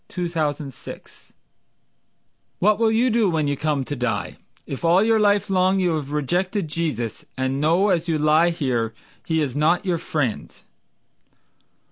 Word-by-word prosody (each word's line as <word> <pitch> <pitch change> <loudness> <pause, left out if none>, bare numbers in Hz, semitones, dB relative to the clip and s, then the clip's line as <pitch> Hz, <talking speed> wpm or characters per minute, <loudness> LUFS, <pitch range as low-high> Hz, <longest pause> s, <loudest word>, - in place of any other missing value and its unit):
Le 180 - 0
Roy 175 - -2 0.3
Goldman 140 -3 -8 1.8
"What 210 +2 +2
will 225 -1 +3
you 235 +3 +2
do 220 -3 +2
when 155 -3 0
you 145 - 0
come 145 -2 -1
to 145 - -4
die, 125 -2 -3 0.3
If 135 - -7
all 175 +4 +4
your 225 0 +3
life 205 -1 +2
long 190 0 +2
you 180 -3 +1
have 150 -3 -3
rejected 175 - -1
Jesus, 150 -9 -3
And 130 +1 -1
know 170 +7 +3
as 175 -2 +1
you 165 -2 +1
lie 155 +3 +4
there, 120 -9 -2 0.3
He 160 -1 +1
is 135 -5 -2
not 165 +6 +2
your 175 -3 0
friend?" 140 -10 -2
165 Hz, 160 wpm, -22 LUFS, 145-190 Hz, 1.8 s, all